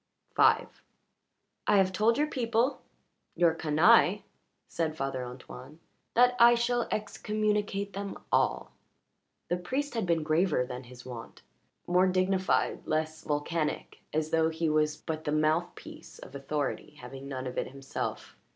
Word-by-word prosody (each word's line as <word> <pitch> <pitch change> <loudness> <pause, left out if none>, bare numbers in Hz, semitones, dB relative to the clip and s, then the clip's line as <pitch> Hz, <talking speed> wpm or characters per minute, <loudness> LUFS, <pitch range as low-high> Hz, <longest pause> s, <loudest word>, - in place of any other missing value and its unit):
V - - +5 1.0
"I 205 - +5
have 190 -1 +3
told 225 +5 +3
your 300 - +3
people 240 -2 0 0.5
your 170 -1 +4
canaille," 175 +6 +4 0.4
said 160 -2 -2
Father 135 -2 -2
Antoine, 125 +4 -10 0.4
"that 245 +1 +5
I 235 0 +8
shall 240 0 0
excommunicate 210 -1 -1
them 200 0 -5
all." - - +1 0.8
The 175 - +1
priest 265 +11 -3
had 225 -6 -2
been 165 -2 +1
graver 155 -3 +2
than 125 +1 -7
his 125 0 -13
wont 120 -3 -9 0.4
more 180 +2 +3
dignified, 185 +1 +1
less 155 0 -1
volcanic, 150 +2 -2
as 155 +1 -1
though 160 0 +3
he 160 0 -1
was 155 0 +1
but 155 -1 -5
the 150 - -2
mouthpiece 155 +3 -2
of - - -12
authority, 145 +1 -3
having 135 +2 -9
none 130 -1 -5
of 125 - -3
it - - -2
himself. 135 0 -6
165 Hz, 140 wpm, -29 LUFS, 150-205 Hz, 1.0 s, I